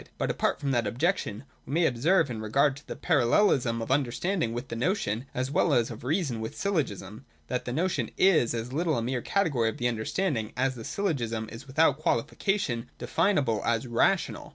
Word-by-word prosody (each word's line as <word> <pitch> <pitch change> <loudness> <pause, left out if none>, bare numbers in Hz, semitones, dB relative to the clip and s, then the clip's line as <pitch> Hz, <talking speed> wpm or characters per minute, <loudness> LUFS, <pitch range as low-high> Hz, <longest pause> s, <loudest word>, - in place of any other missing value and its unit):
But - - 0
apart - - 0
from 140 - -1
that 120 -4 +1
objection, 125 - -1 0.2
we 135 - -5
may 170 0 +3
observe 150 +4 +2
in 110 -2 -5
regard 135 +6 +2
to 145 - -15
the - - -5
parallelism 125 - +2
of 120 - -5
understanding 145 - 0
with 120 +1 -5
the - - -4
notion, 125 - -1
as 130 +2 -2
well - - +3
as 120 -1 +1
of 115 - -9
reason 140 - -1
with 110 - -6
syllogism, 115 - -2 0.3
that 125 -1 -2
the 120 - -3
notion 175 +8 0
is 160 -12 +4
as 115 +2 -4
little 160 -1 +1
a 115 - -1
mere 125 +1 -1
category 145 - +1
of - - -6
the 120 - 0
understanding 115 - -1
as 130 +1 +1
the 120 -3 -9
syllogism 115 - -2
is 120 +4 -10
without 145 +1 +3
qualification 130 - -1
definable 125 - +1
as 115 +1 0
rational. 120 -1 +1
125 Hz, 190 wpm, -28 LUFS, 115-160 Hz, 0.3 s, is